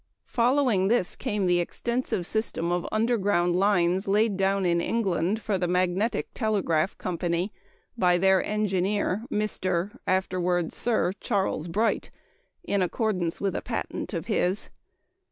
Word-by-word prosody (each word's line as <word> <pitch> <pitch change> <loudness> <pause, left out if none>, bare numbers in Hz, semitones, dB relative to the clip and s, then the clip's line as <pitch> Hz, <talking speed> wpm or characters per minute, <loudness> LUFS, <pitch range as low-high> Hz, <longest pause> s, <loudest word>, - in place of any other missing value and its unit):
Following 240 -5 +2
this 215 -4 +1
came 205 -2 -2
the 175 -1 +3
extensive 235 +1 -2
system 175 -5 -1
of 175 0 -1
underground 205 -6 +2
lines 185 -1 +2
laid 210 +1 +2
down 195 0 +1
in 170 -1 +2
England 195 -2 0
for 200 -3 0
the 180 - 0
Magnetic 180 +5 0
Telegraph 195 -7 0
Company 175 +2 -2 0.4
by 180 -6 +3
their 190 +1 +4
engineer, 205 0 0
Mr. 190 -4 -1
(afterward 180 -2 0
Sir 220 -6 0
Charles) 195 -6 -1
Bright, 215 +7 0 0.5
in 200 -1 0
accordance 185 -3 -1
with 195 -1 -1
a - - -2
patent - - -4
of - - -3
his. 185 +3 0
190 Hz, 130 wpm, -26 LUFS, 175-215 Hz, 0.5 s, their